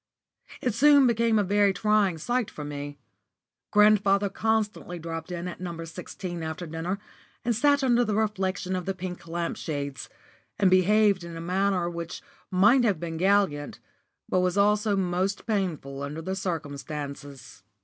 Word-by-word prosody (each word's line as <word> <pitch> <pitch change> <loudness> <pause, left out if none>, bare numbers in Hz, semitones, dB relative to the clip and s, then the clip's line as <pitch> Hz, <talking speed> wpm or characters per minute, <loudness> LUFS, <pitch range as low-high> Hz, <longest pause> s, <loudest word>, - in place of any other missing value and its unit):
It 245 - +1
soon 285 +3 +6
became 230 -2 +3
a 205 - +3
very 200 0 +3
trying 205 -2 +2
sight 240 +7 -1
for 150 - -8
me. 145 0 -6 0.7
Grandfather 205 -1 +4
constantly 215 -3 -1
dropped 165 0 -6
in 175 0 -4
at 180 - -7
No. 170 -2 -5
16 175 +1 -7
after 160 +2 -4
dinner, 165 +4 -3 0.5
and 235 -1 +1
sat 285 +4 +3
under 245 -2 +4
the 215 -3 -1
reflection 190 -3 -1
of 185 -1 -4
the 195 - -1
pink 180 -1 -7
lamp 170 0 -3
shades, 140 -5 -5 0.5
and 190 -2 +3
behaved 200 0 +4
in 170 -1 -7
a - - -6
manner 185 +1 0
which 170 -1 -6 0.3
might 210 +7 +5
have 205 -8 +2
been 165 -1 -4
gallant, 185 -6 +1 0.5
but 185 - +1
was 180 +1 +1
also 210 +1 +3
most 190 +1 -1
painful 170 - -2
under 150 +3 -5
the 190 +3 -3
circumstances. 145 - -6
185 Hz, 155 wpm, -27 LUFS, 165-210 Hz, 0.7 s, soon